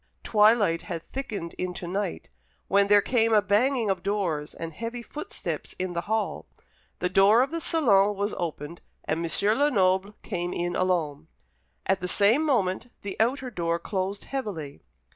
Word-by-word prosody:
Twilight 210 -5 +4
had 170 -4 -6
thickened 220 -11 -5
into 180 -1 -4
night, 190 +1 -4 0.4
when 200 0 +3
there 205 0 +5
came 230 -3 +2
a 215 - +7
banging 220 +2 +2
of 185 -2 -2
doors 180 -7 -2
and 165 -1 -6
heavy 235 +6 -5
footsteps 380 - -5
in 185 -1 -3
the 170 - -1
hall. 220 0 -1 0.5
The 180 - 0
door 195 +6 +5
of 270 - -4
the 335 0 -3
salon 210 -13 +3
was 200 +2 -2
opened, 165 -1 -5 0.2
and 160 +2 -2
M. 165 - -2 0.3
Lenoble 195 -8 +2
came 175 -3 -3
in 175 0 -2
alone. 160 -5 -1 0.6
At 190 0 +1
the 180 - -3
same 210 +10 +4
moment 235 -6 0
the 200 -2 -4
outer 255 +3 0
door 170 -4 -1
closed 195 +2 -3
heavily. 190 - -5
200 Hz, 160 wpm, -26 LUFS, 175-225 Hz, 0.6 s, a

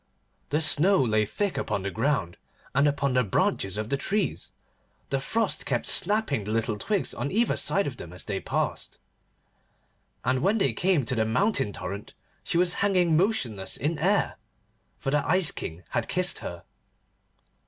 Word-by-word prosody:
The 150 +2 +1
snow 175 +5 +4
lay 110 -3 +1
thick 200 - -2
upon 100 -3 -2
the 100 - -2
ground, 110 -6 -1 0.4
and 140 +1 +4
upon 140 -2 0
the 125 0 +3
branches 95 -1 0
of 110 +1 -3
the 140 - +1
trees: 200 +6 -1 0.6
the 135 - +1
frost 225 +9 -1
kept 120 -3 0
snapping 205 - +2
the 100 - -7
little 110 -1 -1
twigs 205 -2 -1
on 140 - -3
either 230 +4 +2
side 200 - +1
of 130 -3 -5
them, 85 - -9
as 90 - -6
they 105 -4 -3
passed: - - -3 1.3
and 130 +1 +1
when 200 +5 +2
they 140 - +1
came 175 0 +1
to 115 - -2
the 115 -3 +1
Mountain 135 - +1
Torrent 100 +3 -7 0.3
she - - 0
was 175 0 +3
hanging 180 -5 +3
motionless 135 - 0
in 150 +4 -1
air, 195 +6 +1 0.6
for 135 - -3
the 145 0 +2
Ice 185 -2 +4
King 85 +2 -7
had - - -1
kissed - - 0
her. - - -7
140 Hz, 170 wpm, -27 LUFS, -, 1.3 s, snow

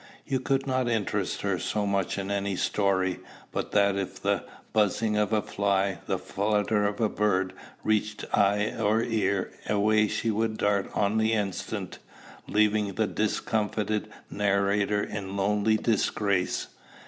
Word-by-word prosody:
You 135 -1 0
could 135 +1 0
not 130 -2 0
interest 105 -4 -1
her 100 -3 0
so 105 +5 -1
much 100 -2 0
in 100 0 -3
any 100 -1 -1
story, 95 -1 +1 0.3
but - - -3
that 100 -1 +4
if 95 -1 -4
the - - 0 0.3
buzzing 105 +1 +2
of 105 0 +1
a 110 -1 +2
fly, 100 -1 0
the - - 0
flutter 105 +1 0
of 100 0 -4
a 110 - +3
bird, 95 -3 0 0.3
reached 110 0 0
eye 105 +1 +3
or 110 +1 +2
ear, 105 -4 0 0.2
away 110 +1 +3
she 115 +2 -1
would 110 +1 -1
dart 100 -1 +1
on 105 +1 +2
the 110 +1 +2
instant, 100 -4 -3 0.5
leaving 105 -2 +2
the 110 - +2
discomfited 105 0 -1 0.2
narrator 100 0 +1
in 100 -1 -5
lonely 105 +2 +2
disgrace. 100 -4 0
105 Hz, 145 wpm, -27 LUFS, 100-110 Hz, 0.5 s, that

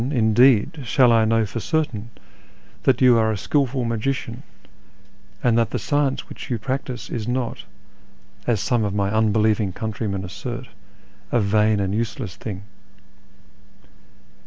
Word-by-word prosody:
Thou, - - -2
iiuleed, 130 +3 +3
shall 125 0 +4
T 110 -1 +4
know 115 -1 +3
for 110 +3 -5
certain 120 -6 -2 0.8
that 130 -2 +3
you 125 -2 +6
aro 110 -1 +2
a - - -3
skilful 130 +3 0
luai^ician, 115 +1 -2 1.1
and 120 -2 +3
that 115 - +1
the - - -2
science 145 -2 0
which - - -9
you 120 - 0
practise 125 -1 -4
is 115 -2 -3
not 125 -1 -2 0.8
(as 115 -4 +2
some 110 +3 +1
of 100 -1 -2
my 100 -1 0
uulx'licvin_Ljf 110 -2 +2
countrymen 105 -3 -3
assert) 120 +6 -6 0.6
a 120 - +3
vain 105 0 +2
and 100 0 -1
useless 110 -4 -3
thing." 100 -3 -7
115 Hz, 140 wpm, -22 LUFS, 105-125 Hz, 1.1 s, you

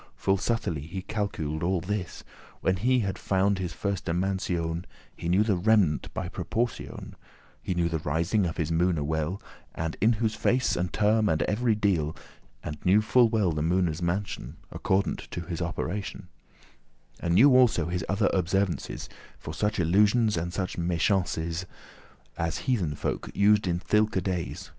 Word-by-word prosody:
Full 95 0 +1
subtilly 95 - -1
he 95 +3 -5
calcul'd 95 -8 -3
all 90 +1 +1
this. 95 0 -4 0.4
When 95 0 +1
he 125 +5 +2
had 100 -3 -3
found 95 0 +1
his 90 -2 -3
firste 100 -3 -3
mansion, 85 -2 -1 0.3
He 85 - -4
knew 95 +4 +4
the 105 -3 +1
remnant 95 -5 +2
by - - -4
proportion; 120 +1 -4 0.5
And 90 - 0
knew 85 -1 +1
the 80 -1 -1
rising 85 +7 0
of 85 - -5
his 80 -1 -1
moone 85 -2 +1
well, 80 +5 -1 0.4
And 80 0 -3
in 110 +4 +5
whose 110 0 0
face, 125 +4 +1
and 90 +1 -1
term, 110 0 +2
and 80 - +1
every 110 +1 +1
deal; 90 -8 0 0.5
And 75 0 -6
knew 100 +4 +4
full 120 +1 +4
well 105 -6 +2
the 75 -1 -2
moone's 85 0 +1
mansion 85 -6 -3 0.2
Accordant 95 +1 -1
to 85 - -5
his 85 0 -5
operation; 90 +2 -4 0.9
And 85 0 0
knew 130 +6 +7
also 120 -10 +4
his 90 +1 -2
other 100 +2 +2
observances, 95 0 -1 0.3
For 75 - -8
such 105 +3 -1
illusions 105 +6 +3
and 85 +1 -2
such 90 -1 -3
meschances,* 85 -1 0 0.3
*wicked 80 0 -2
devices 85 +2 -3 0.7
As 85 0 -1
heathen 100 - 0
folk - - -3
used 105 0 +4
in 85 -1 +1
thilke 105 0 +1
days. 90 -3 -3
95 Hz, 165 wpm, -27 LUFS, 85-105 Hz, 0.9 s, knew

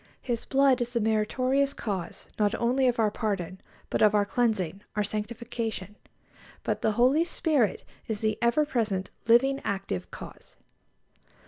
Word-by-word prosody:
His 240 -3 -2
blood 270 -2 +3
is 240 0 -2
the 235 - +1
meritorious 255 +6 +1
cause 195 -6 -5
not 210 +1 +2
only 255 +3 +2
of 245 - +1
our 220 -2 +2
pardon, 195 -5 -3 0.3
but - - 0
of 215 -1 +5
our 205 -1 +3
cleansing, 200 -6 0
our 210 - +1
sanctification; 215 -1 -4 0.7
but - - -1
the 220 - +2
Holy 255 +8 +4
Spirit 305 - +1 0.2
is 215 -2 -3
the 215 -1 +1
ever 235 +6 +3
present, 215 -9 -1 0.2
living, 270 +4 +4
active 95 - -3
Cause. - - -11
225 Hz, 145 wpm, -28 LUFS, 205-250 Hz, 0.7 s, of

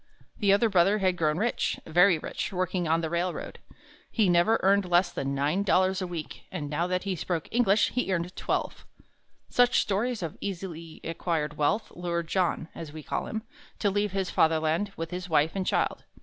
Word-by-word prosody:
The 200 -2 +3
older 205 +4 +4
brother 195 0 +4
had 185 -3 +1
grown 155 -2 +1
rich 230 +5 0
very 175 +2 +5
rich 155 - -4
working 180 -1 -1
on 165 +1 +2
the 160 - -2
railroad. 175 +1 -3 0.5
He 215 -5 +2
never 175 +6 +4
earned 200 +1 +4
less 175 +1 +3
than 140 0 -3
nine 145 +7 +1
dollars 190 -1 +2
a 185 - -2
week, 170 -3 -7
and 160 -6 -4
now 170 +4 0
that 180 0 -1
he 195 -1 -2
spoke 165 -1 -3
English, 220 -3 +3
he 250 -6 -1
earned 180 0 -2
twelve. - - -2 0.6
Such 245 0 +4
stories 215 +2 -1
of 160 - -6
easily 170 -4 -6
acquired 160 -2 -2
wealth 150 +10 0
lured 170 -1 -3
John, 180 -3 0
as 160 -3 -8
we 155 0 -9
call - - -3
him, 220 0 -4 0.3
to 205 - +1
leave 205 0 0
his 195 -1 -2
Fatherland 160 +5 +2
with 165 +1 -4
his 180 +1 -5
wife 155 0 +3
and 190 -1 -2
child. - - 0
180 Hz, 190 wpm, -28 LUFS, 165-195 Hz, 0.6 s, very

